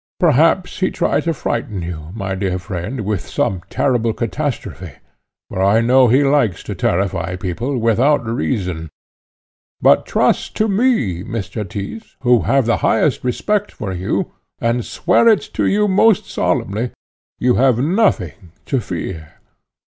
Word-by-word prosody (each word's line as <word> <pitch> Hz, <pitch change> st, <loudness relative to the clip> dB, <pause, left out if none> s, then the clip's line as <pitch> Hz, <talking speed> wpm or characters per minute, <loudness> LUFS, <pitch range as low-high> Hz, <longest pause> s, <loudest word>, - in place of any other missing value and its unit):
Perhaps 165 Hz, +3 st, +3 dB
he 185 Hz, -, +2 dB
tried -, -, 0 dB
to 165 Hz, -, +1 dB
frighten 105 Hz, -6 st, -3 dB
you, 80 Hz, -3 st, -6 dB
my 100 Hz, -3 st, -3 dB
dear 95 Hz, -1 st, -1 dB
friend, 95 Hz, +6 st, -5 dB
with 105 Hz, -2 st, -2 dB
some 95 Hz, -2 st, -1 dB
terrible 120 Hz, -4 st, +1 dB
catastrophe, 135 Hz, +4 st, -4 dB, 0.5 s
for 95 Hz, -, -4 dB
I 100 Hz, +3 st, +4 dB
know 125 Hz, +2 st, +5 dB
he 130 Hz, +5 st, +4 dB
likes 135 Hz, -, +1 dB
to -, -, -5 dB
terrify 90 Hz, -1 st, -1 dB
people 110 Hz, +9 st, -3 dB
without 120 Hz, +4 st, +2 dB
reason. 90 Hz, -5 st, -2 dB, 0.9 s
But -, -, +4 dB
trust -, -, +1 dB
to 215 Hz, -, +1 dB
me, 195 Hz, -, +1 dB
Mr. 110 Hz, 0 st, -4 dB
Tyss, 110 Hz, -, -7 dB
who 125 Hz, -2 st, +4 dB
have 135 Hz, -3 st, +3 dB
the 115 Hz, -, +2 dB
highest 130 Hz, +5 st, +1 dB
respect 205 Hz, -, -1 dB
for 95 Hz, -3 st, -5 dB
you, 90 Hz, +1 st, -2 dB, 0.3 s
and 115 Hz, +1 st, 0 dB
swear 180 Hz, -, +2 dB
it 220 Hz, -2 st, +4 dB
to -, -, 0 dB
you 210 Hz, +1 st, +2 dB
most 205 Hz, +1 st, +4 dB
solemnly, 110 Hz, +5 st, -1 dB, 0.5 s
you 125 Hz, 0 st, +2 dB
have 130 Hz, -3 st, +4 dB
nothing 120 Hz, -, 0 dB
to 135 Hz, -, 0 dB
fear. 85 Hz, -5 st, -6 dB
115 Hz, 145 wpm, -18 LUFS, 95-145 Hz, 0.9 s, know